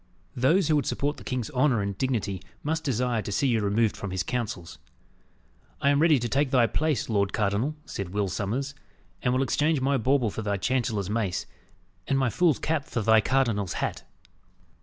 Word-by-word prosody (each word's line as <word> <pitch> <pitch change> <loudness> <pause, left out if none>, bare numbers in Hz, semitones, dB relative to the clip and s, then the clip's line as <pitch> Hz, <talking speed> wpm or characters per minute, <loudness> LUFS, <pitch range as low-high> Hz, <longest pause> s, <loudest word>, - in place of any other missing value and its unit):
Those 155 +8 +3
who 155 - +3
would 145 - -1
support 145 +1 -1
the - - -11
king's 125 -4 -3
honour 130 -2 +2
and 100 -1 -2
dignity 105 -5 -1 0.2
must 160 +2 -1
desire 125 -4 0
to 100 - -6
see 135 +8 +1
you 115 -2 +2
removed 105 +2 +1
from 100 - -5
his 95 -1 -2
counsels." 100 -7 -4 1.0
"I 140 - +3
am 145 +1 +3
ready 160 -3 +5
to 120 -1 -2
take 140 +3 +1
thy 125 -3 +4
place, 150 +1 0
lord 100 -3 0
cardinal," 105 +8 0
said 100 -3 -5
Will 100 +1 -1
Sommers; 120 +9 -2 0.5
"and 125 - +1
will 130 +2 +2
exchange 150 +3 +1
my 135 +1 +1
bauble 130 -2 +2
for 110 - -5
thy 100 -1 -1
chancellor's 110 -3 -1
mace, 105 -5 -1 0.6
and 135 - +1
my 130 -3 +1
fool's 170 -2 +3
cap 155 -2 -1
for 115 - -3
thy 110 +1 +5
cardinal's 115 -6 +1
hat." - - -3
120 Hz, 190 wpm, -27 LUFS, 105-140 Hz, 1.0 s, ready